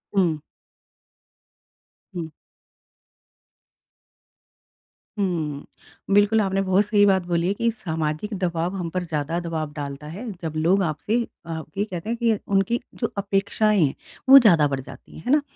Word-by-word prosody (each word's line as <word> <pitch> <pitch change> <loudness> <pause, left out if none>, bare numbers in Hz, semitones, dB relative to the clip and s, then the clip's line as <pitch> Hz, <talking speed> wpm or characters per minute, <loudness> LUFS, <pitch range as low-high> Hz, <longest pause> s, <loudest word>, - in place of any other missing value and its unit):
हुँ। 175 -5 +3 1.8
हुँ। 165 -2 -4 2.9
हुँ, 160 -7 -2 0.5
बिल्कुल 205 +2 +4
आपने 195 -1 0
बहुत 190 +2 +2
सही 205 -1 +4
बात 190 -1 +4
बोली 170 0 0
है 195 - +2
कि 230 +3 0
सामाजिक 160 -1 -3
दबाव 175 0 -1
हम 175 -3 -3
पर 180 +2 -2
ज़्यादा 165 0 -2
दबाव 160 -3 -4
डालता 145 0 -6
है, 200 +10 -6
जब 160 - -3
लोग 175 +5 +3
आपसे 165 +7 -1 0.3
अ, 160 -1 -4 0.2
ये 200 - +2
कहते 185 -1 -6
हैं 235 - -1
कि 230 -3 +2 0.2
उनकी 195 +5 +2 0.2
जो 230 - -1
अपेक्षाएँ 200 +1 +1
हैं 135 - -1 0.4
वो 275 +1 +12
ज़्यादा 170 - +5
बढ़ 135 -1 -2
जाती 130 - -12
है, - - -9
है 250 - 0
ना? 295 - +5
185 Hz, 145 wpm, -23 LUFS, 160-205 Hz, 2.9 s, वो